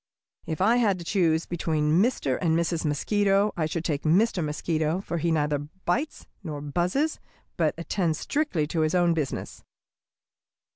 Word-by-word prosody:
"If 160 +2 -3
I 225 +5 +4
had 210 -6 +2
to 170 - -9
choose 165 -4 +2
between 160 -1 +1
Mr. 205 - 0
and 165 -2 +2
Mrs. 170 -1 -1
Mosquito, 200 +7 +2
I 160 -4 0
should 165 +1 -3
take 150 -3 -1
Mr. 180 +3 +2
Mosquito, 155 +2 -1
for 170 -3 -4
he 170 - 0
neither 150 -2 +1 0.3
bites 280 - -1 0.2
nor 155 -5 -5
buzzes, 180 - -1 0.4
but 160 -3 +1
attends 170 -1 -1
strictly 280 - -1
to 160 +2 -3
his 155 +2 +1
own 175 -1 +3
business. 155 -5 -4
170 Hz, 155 wpm, -26 LUFS, 155-195 Hz, 0.4 s, I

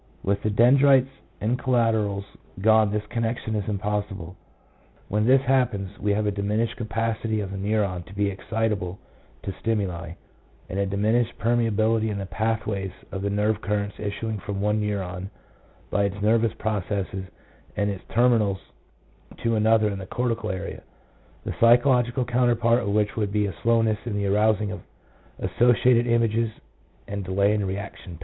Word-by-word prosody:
With 100 +1 0
the 110 - 0
dendrites 130 +4 +5 0.3
and 115 +5 0
collaterals 110 -6 +1 0.3
gone 110 +1 +4
this 105 0 -1
connec 115 0 -1
tion 110 - -5
is 105 -1 -2
impossible. 100 -3 -3 0.7
When 105 +2 +1
this 135 +1 +5
happens 120 -7 +1
we 105 - 0
have 105 +1 0
a 105 - +1
diminished 105 +3 -1
capacity 115 -1 -2
of 100 -2 -4
the 100 - -5
neuron 100 -3 -1
to 95 - -12
be 100 +1 +1
excitable 100 -2 -2 0.5
to 95 - -4
stimuli, 90 -7 -2 0.5
and 95 - -4
a 100 - +1
diminished 110 +4 +1
permeability 115 -1 +1
in 105 - -3
the 100 - -3
path 110 +2 -1
ways 100 -2 -2 0.2
of 95 - -4
the 100 - -1
nerve 105 +1 0
currents 105 -1 -2
issuing 105 +1 -3
from 100 0 -5
one 105 +1 +1
neuron 95 -3 -3 0.6
by 100 - +2
its 100 +1 -3
nervous 110 +2 +2
processes 100 -2 -2 0.5
and 105 0 +1
its 95 -2 -7
terminals 115 -5 +3 0.9
to 115 - +2
another 110 0 +4
in 100 - -5
the 95 - -8
cortical 115 -2 -2
area, 95 0 -5 0.6
the - - -3
psychological 120 +1 +4
counterpart 120 -1 +2
of - - -4
which 105 0 +1
would 105 -3 -1
be 105 0 +1
a 100 - -3
slowness 115 -2 +2
in 110 - -2
the 100 - -1
arousing 105 +1 +2
of 105 - -6 0.6
asso 120 +7 +3
ciated 120 0 +3
images, 115 -1 +2 0.6
and 100 0 -4
delay 100 +3 +2
in 105 -1 0
reaction 95 -2 -5
time. 80 - -11
105 Hz, 165 wpm, -25 LUFS, 100-115 Hz, 0.9 s, dendrites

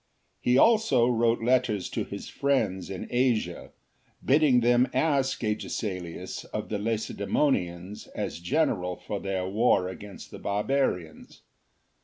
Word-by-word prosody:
He 125 +1 +2
also 220 - +5
wrote 115 -1 +2
letters 120 -5 +2
to - - -1
his - - -7
friends 105 -11 0
in 95 -2 -5
Asia, 120 -2 0 0.6
bidding 135 -3 +4
them 120 +2 +4
ask 135 -1 +1
Agesilaiis 100 -5 -4
of - - -5
the 105 - -2
Lacedaemonians 100 -3 -1
as - - -3
general 95 - 0
for 105 +2 -5
their. 95 -1 -2
war 100 -2 +2
against 100 +1 -10
the - - -9
Barbarians. 100 - -2
115 Hz, 120 wpm, -27 LUFS, 95-130 Hz, 0.6 s, also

